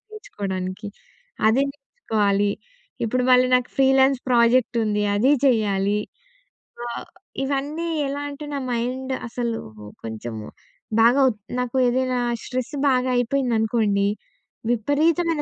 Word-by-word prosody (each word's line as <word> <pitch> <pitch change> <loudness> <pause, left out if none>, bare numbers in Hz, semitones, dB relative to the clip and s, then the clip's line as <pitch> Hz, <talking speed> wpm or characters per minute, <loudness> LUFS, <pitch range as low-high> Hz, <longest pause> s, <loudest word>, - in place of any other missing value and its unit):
నేర్చుకోవడానికి 195 - -5 0.6
అదే 255 +5 +3
నేర్చుకోవాలి. 210 - -1 0.6
ఇప్పుడు 250 +3 0
మళ్ళీ 250 0 +6
నాకు 250 - -2
ఫ్రీలాన్స్ 270 0 +4
ప్రాజెక్టుంది. 235 -3 +3
అది 255 +7 +3 0.2
చెయ్యాలి. 205 -4 +2 0.9
ఆహ్, 235 - -5 0.4
ఇవన్నీ 285 +5 -2 0.2
ఎలా 280 +1 -3
అంటే 285 +1 -8
నా 280 - -2
మైండ్ 255 +3 -2
అసలు 235 -1 -2 0.5
కొంచెము 110 -1 -6 0.5
బాగా 240 +4 +5
ఒ - - 0 0.3
నాకు 250 +1 -2
ఏదైనా 255 0 +1 0.2
స్ట్రెస్ 255 +3 -4 0.2
బాగా 255 -1 +2
అయిపోయిందనుకోండి, 225 -5 +1 0.6
విపరీతమైన 305 +7 +1
245 Hz, 100 wpm, -23 LUFS, 215-270 Hz, 0.9 s, మళ్ళీ